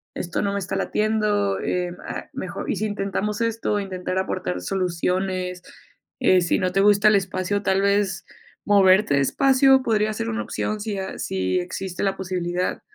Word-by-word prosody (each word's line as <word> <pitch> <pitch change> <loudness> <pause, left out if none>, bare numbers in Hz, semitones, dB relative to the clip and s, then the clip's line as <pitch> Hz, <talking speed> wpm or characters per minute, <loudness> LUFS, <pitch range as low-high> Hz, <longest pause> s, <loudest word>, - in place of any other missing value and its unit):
esto 175 - -3
no 200 -1 -1
me 200 - -1
está 185 - -4
latiendo, 210 -2 0
em, 180 -1 -2
ah, - - -6
mejor, - - -5
y - - +1
si 215 - -1
intentamos 205 +1 -2
esto". 225 -2 0
Intentar 185 -2 -4
aportar 90 - -2
soluciones, 180 - -2 0.6
eh, 185 -1 +4
si 170 - +1
no 185 -1 0
te 195 - +1
gusta 205 +1 +5
el 210 - +4
espacio, 195 +1 -1
tal 190 0 +2
vez 200 -1 +1 0.4
moverte 195 -2 +5
de 140 - +3
espacio, 270 - +4
podría 215 -2 +1
ser 115 - -3
una 110 -1 -2
opción. 215 - -3
Si 210 -1 -4
a 190 0 -5
si 95 - -1
existe 180 0 -5
la 195 -1 0
posibilidad. 180 -1 -2
195 Hz, 170 wpm, -23 LUFS, 180-205 Hz, 0.6 s, gusta